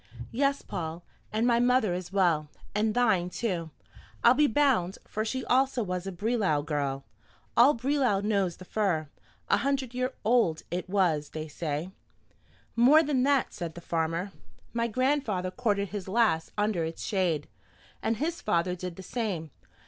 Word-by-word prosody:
"Yes, 275 +3 +1
Paul, 170 -2 -5 0.3
and 220 +2 +1
my 235 -1 +4
mother 245 -5 +3
as 180 0 -5
well; 170 -6 +2 0.2
and 215 +1 +1
thine 210 -8 +3
too, 180 -6 -2 0.5
I'll 235 - +8
be 295 +2 +4
bound, 230 -9 +2
for 215 - -3
she 260 +3 -3
also 260 -1 +2
was 180 -1 -3
a - - -2
Brelau 195 -6 0
girl. 140 -3 -2 0.5
All 250 +5 +6
Brelau 255 -4 +1
knows 200 -5 0
the 185 - -11
fir, 175 -8 0 0.4
a - - +4
hundred 270 -3 -1
years 255 +1 0 0.2
old 220 -9 +3
it 180 +1 -3
was, 175 -7 +1
they 155 0 -5
say." 155 +3 -4 0.8
"More 270 +7 +6
than 285 -4 +1
that," 275 -1 +2
said 170 -3 -5
the - - -7
farmer. 165 +2 -2 0.4
"My 235 0 0
grandfather 235 -7 0
courted 205 -4 0
his 200 -3 -5
lass 195 -6 +2
under 205 -5 +1
its 160 +1 -5
shade, 175 -7 0 0.5
and 220 0 0
his 330 +6 -2
father 170 +1 +1
did 180 -1 -6
the 190 - -9
same. 185 - -3
200 Hz, 160 wpm, -28 LUFS, 175-245 Hz, 0.8 s, I'll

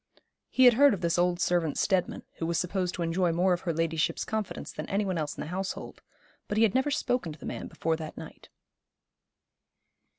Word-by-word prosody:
He 260 - +4
had 245 - +9
heard 280 -1 +5
of 185 - -10
this 170 0 +1
old 175 0 +2
servant 175 -4 +1
Steadman, 190 -3 0 0.2
who 165 - -1
was 170 -1 0
supposed 180 +1 -1
to 175 - -2
enjoy 170 +1 +1
more 180 +2 +2
of 175 - -2
her 175 - -1
ladyship's 165 -1 0
confidence 220 -2 -4
than - - -7
any 200 +1 0
one 185 -3 -1
else 150 -2 -3
in - - -5
the - - -5
household; 190 +2 -5 0.5
but 205 - -2
he 225 - +5
had 215 -3 +3
never 265 +3 +2
spoken 250 - -1
to - - -13
the - - -10
man - - -5
before 165 0 -1
that 155 -1 -8
night. - - -11
180 Hz, 210 wpm, -28 LUFS, 165-205 Hz, 0.5 s, had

